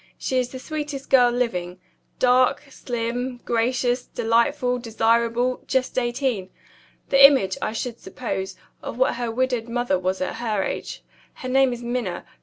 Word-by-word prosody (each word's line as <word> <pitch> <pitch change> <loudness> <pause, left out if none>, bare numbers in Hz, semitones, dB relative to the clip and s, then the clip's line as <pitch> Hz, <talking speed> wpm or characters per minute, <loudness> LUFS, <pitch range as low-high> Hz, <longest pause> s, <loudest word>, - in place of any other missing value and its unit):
She 260 - 0
is 250 -1 -1
the 260 - -7
sweetest 295 0 -5
girl 250 -2 +6
living. 185 -8 -2 0.4
Dark, 255 +2 +3
slim, 245 +1 -3
gracious, 245 +1 0
delightful, 245 +2 +1
desirable, 235 +2 +1
just 260 -1 0
eighteen. 240 -5 -1 0.6
The 275 0 +6
image, 265 -10 +7
I - - -2
should 235 +1 -4
suppose, 190 -2 -5 0.3
of - - -6
what 260 - +2
her 240 -1 -2
widowed 245 -1 -1
mother 240 -6 0
was 185 +1 -1
at 185 - -3
her 215 -4 -1
age. - - -5 0.3
Her 255 - -6
name 265 0 +4
is 240 0 -6
Minna. 235 -7 -3
245 Hz, 150 wpm, -23 LUFS, 230-255 Hz, 0.6 s, image